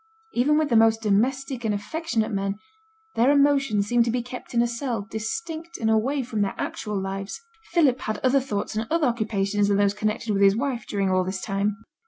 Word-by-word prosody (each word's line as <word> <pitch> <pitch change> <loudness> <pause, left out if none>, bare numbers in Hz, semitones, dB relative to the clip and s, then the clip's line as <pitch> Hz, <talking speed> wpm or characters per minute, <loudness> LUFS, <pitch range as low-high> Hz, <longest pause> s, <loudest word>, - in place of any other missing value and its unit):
Even 290 +5 +3
with 310 -1 +1
the 235 - +2
most 225 0 +4
domestic 250 +5 0
and 215 -2 0
affectionate 230 +1 -2
men, 195 -1 -1 0.6
their 240 +4 +3
emotions 280 -7 +3
seem 240 +3 +2
to 235 - +2
be 245 +1 -1
kept 250 0 -9
in 235 - +4
a - - +1
cell 235 -3 -3
distinct 325 +9 -5
and 220 -1 +1
away 260 +6 +1
from 225 -3 -3
their 200 -1 -1
actual 210 -2 -3
lives. 195 +1 -4 0.3
Philip 295 -7 +3
had 215 -3 -3
other 260 +2 +4
thoughts 215 -5 -3
and 220 +1 -2
other 330 -1 +2
occupations 210 -4 0
than 200 -1 +2
those 200 0 +3
connected 215 +1 -2
with 200 - 0
his 200 +1 +5
wife 250 -4 -2
during 195 -2 0
all 185 0 +2
this 190 +1 -3
time. 200 +2 -2
225 Hz, 205 wpm, -25 LUFS, 205-265 Hz, 0.6 s, his